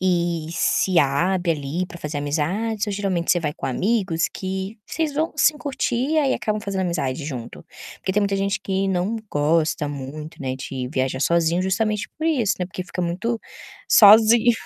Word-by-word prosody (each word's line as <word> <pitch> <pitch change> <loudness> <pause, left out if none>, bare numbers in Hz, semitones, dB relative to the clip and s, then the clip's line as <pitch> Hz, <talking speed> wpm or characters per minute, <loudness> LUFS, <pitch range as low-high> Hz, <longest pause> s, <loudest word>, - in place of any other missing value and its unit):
e 175 -3 0
se 175 +1 +2
abre 170 +5 +2
ali 155 +4 -3
para 175 - -11
fazer 150 -1 -4
amizades 185 +10 -1
ou 205 - -2
geralmente 195 -4 -1
você 175 - +4
vai 150 -3 -2
com - - -8
amigos 180 - 0
que 190 +3 -5
vocês 315 -3 -2
vão 315 +2 0
sim 305 - +4
curtir, 275 +1 -1
aí 280 -3 +2
acabam 215 -1 -2
fazendo 200 -2 -3
amizade 150 -6 -2
junto? 125 -6 -7 0.3
Porque 190 - -2
tem 210 - +2
muita 200 -1 0
gente 195 0 -1
que 195 0 -1
não 190 +4 0
gosta 155 0 +1
muito, 145 +3 -7
né, 130 -1 -3
de 130 -1 -5
viajar 130 -2 -1
sozinho 170 +3 +2
justamente 210 +3 0
por 315 - -1
isso, 255 -11 +2
né, 180 - -2
porque 185 0 -6
fica 180 - -4
muito 190 +8 -2 0.5
sozinho. 220 +3 +7
185 Hz, 175 wpm, -22 LUFS, 155-210 Hz, 0.5 s, sozinho